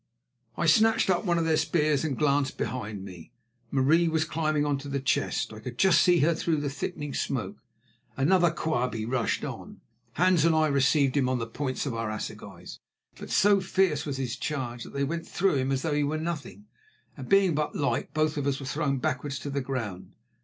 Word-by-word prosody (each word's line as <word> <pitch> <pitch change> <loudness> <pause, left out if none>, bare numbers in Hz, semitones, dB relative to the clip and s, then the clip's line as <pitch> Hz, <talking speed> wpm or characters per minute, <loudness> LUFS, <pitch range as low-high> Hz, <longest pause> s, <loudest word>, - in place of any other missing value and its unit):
I 170 - 0
snatched 215 +5 +4
up 180 +3 0
one 175 -2 +2
of 165 - +1
their 160 -1 +3
spears 155 -2 +1
and 145 -5 -2
glanced 140 -2 +1
behind 105 -6 -4
me. 90 -4 -11 0.4
Marie 150 +7 +3
was 160 -1 +1
climbing 155 -2 0
on 145 -2 0
to 145 - -9
the 140 0 -1
chest; 130 -3 -1
I 110 - -9
could 120 +2 -8
just 190 +4 +5
see 175 -2 +4
her 165 +4 +3
through 160 0 0
the 145 -1 -2
thickening 145 0 -5
smoke. 115 -8 -3 0.6
Another 175 +5 +4
Quabie 125 -9 -2
rushed 120 0 -1
on. - - -8 0.3
Hans 180 -1 +3
and 165 -1 +4
I 155 -1 +3
received 140 0 +2
him 135 -3 +2
on 130 - +1
the 115 - -3
points 130 +4 -3
of 135 - -2
our 115 -1 -3
assegais, 105 - -7 0.4
but - - -8
so 200 -1 +4
fierce 185 -5 +1
was 140 -3 -4
his 125 -3 -3
charge 125 -6 -4
that - - -12
they 140 0 -1
went 165 +4 -3
through 190 -5 +1
him 130 +1 0
as 135 0 -1
though 160 -2 0
he 145 0 +1
were 150 +2 -1
nothing, 170 +5 -5 0.5
and - - -9
being 195 -3 +4
but 150 0 -2
light, 140 - -1
both 155 0 0
of 140 -1 -1
us 140 -1 0
were 140 - -7
thrown 140 0 -1
backwards 135 +2 -2
to 145 - -6
the 140 0 -1
ground. 105 -9 -5
145 Hz, 210 wpm, -27 LUFS, 130-160 Hz, 0.6 s, just